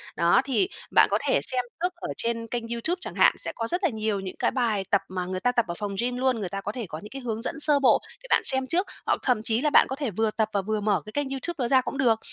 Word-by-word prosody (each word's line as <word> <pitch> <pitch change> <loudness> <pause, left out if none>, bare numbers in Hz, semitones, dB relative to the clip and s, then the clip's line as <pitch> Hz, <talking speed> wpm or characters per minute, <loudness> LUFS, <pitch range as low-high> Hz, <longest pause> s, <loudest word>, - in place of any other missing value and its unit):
Đó, 170 +6 +4
thì 280 +8 +1 0.2
bạn - - +6
có - - +3
thể - - +3
xem 250 -1 0 0.2
trước 360 0 0
ở 345 - -7
trên 230 0 -1
kênh 235 0 -4
YouTube 235 +10 -2
chẳng - - -5
hạn, - - +5
sẽ - - -3
có 230 - -3
rất 355 - -1
là 365 - +4
nhiều 215 -4 -2
những 190 -1 -6
cái - - +1
bài 265 - -3
bài 220 -5 +1
tập 200 - +4
mà 180 -1 -3
người 185 0 -3
ta 245 +6 +2
tập 235 -2 +1
ở 170 - -3
phòng 205 -1 -4
gym 245 +1 -1
luôn, 255 -2 +1
người 195 -4 -3
ta 195 +1 -4
có 205 - -4
thể 235 0 -5
có 155 - -5
những 210 - -11
cái 270 +3 -8
hướng 225 -3 -3
dẫn 315 +6 -3
sơ 295 -1 +3
bộ 270 - +4 0.2
để - - -11
bạn - - +4
xem 265 -1 +4
trước, 360 +7 +1 0.2
hoặc - - +1
thậm 250 -5 +2
chí 225 +1 +1
là 300 - +2
bạn - - +6
có 265 - -2
thể 275 -5 -3
vừa 220 +3 0
tập 220 0 0
và 200 - +1
vừa 215 +2 -2
mở 205 -2 +1
cái 215 - -9
kênh 290 +2 -2
Youtube 270 +6 -4
đó 250 -4 0
ra 260 +1 +4
cũng 265 - -5
được. 235 -4 +3
235 Hz, 315 wpm, -26 LUFS, 215-270 Hz, 0.2 s, bạn